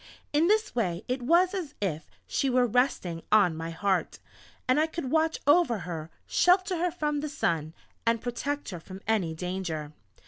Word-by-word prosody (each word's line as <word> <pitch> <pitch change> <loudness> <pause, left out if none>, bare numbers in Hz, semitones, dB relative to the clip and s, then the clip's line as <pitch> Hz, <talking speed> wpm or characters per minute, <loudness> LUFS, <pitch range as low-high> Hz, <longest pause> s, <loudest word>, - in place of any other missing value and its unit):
In 305 +3 +4
this 430 +2 +2
way 185 -6 -1
it 250 +1 -1
was 345 +9 +4
as 330 -7 -4
if 165 -6 -3 0.2
she 275 - 0
were 250 -1 +4
resting 225 -8 0
on 200 -6 +5
my 165 +1 -4
heart, 190 +2 0 0.5
and 255 +3 +4
I 315 - +3
could 315 -5 -5
watch 320 0 +2
over 290 -6 +4
her, 165 -3 -6 0.2
shelter 365 +1 +3
her 355 +1 +2
from 300 -4 -1
the 300 +1 -3
sun, 165 - -1 0.3
and 230 0 +2
protect 275 +5 -3
her 175 - -6
from 185 +3 -10
any 190 -8 +1
danger. 170 -4 -4
240 Hz, 175 wpm, -28 LUFS, -, 0.5 s, on